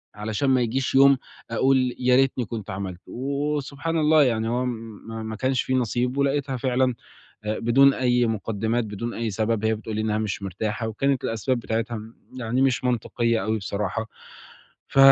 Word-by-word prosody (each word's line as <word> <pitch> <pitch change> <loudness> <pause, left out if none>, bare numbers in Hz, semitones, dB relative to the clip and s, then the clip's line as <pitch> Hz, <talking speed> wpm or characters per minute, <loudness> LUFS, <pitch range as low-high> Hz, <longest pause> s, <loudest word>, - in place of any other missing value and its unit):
علشان 110 +5 -1
ما 130 -1 +4
ييجيش 125 +3 -1
يوم 140 0 +7 0.3
أقول 130 +1 +2
يا 125 0 +4
ريتني 130 -2 +2
كنت 110 -3 -6
عملت، 95 -2 -5
و 140 +3 -3
وسبحان 145 +3 -3
الله 155 -1 +5
يعني 115 -3 +1
هو 125 +2 0
ما 115 -2 -6
ما 110 0 -5
كانش 130 +3 +1
في 130 - -2
نصيب 125 +1 0
ولقيتها 140 -1 0
فعلًا 130 0 +1 0.5
بدون 120 +6 +4
أي 125 -1 +2
مُقدِّمات، 110 +2 -1
بدون 110 +3 -5
أي 115 -1 -2
سبب 110 +1 -1
هي 110 0 +3
بتقول 110 0 -6
لي - - 0
إنها 110 -1 0
مش 105 -2 -3
مرتاحة 105 +4 -3
وكانت 135 +4 0
الأسباب 120 +3 -1
بتاعتها 115 0 -2 0.4
يعني 125 +2 0
مش 130 -2 +2
منطقية 115 -2 0
أوي 110 +1 0
بصراحة، 105 +2 -3 0.8
ف - - -2
120 Hz, 165 wpm, -24 LUFS, 110-130 Hz, 0.8 s, يوم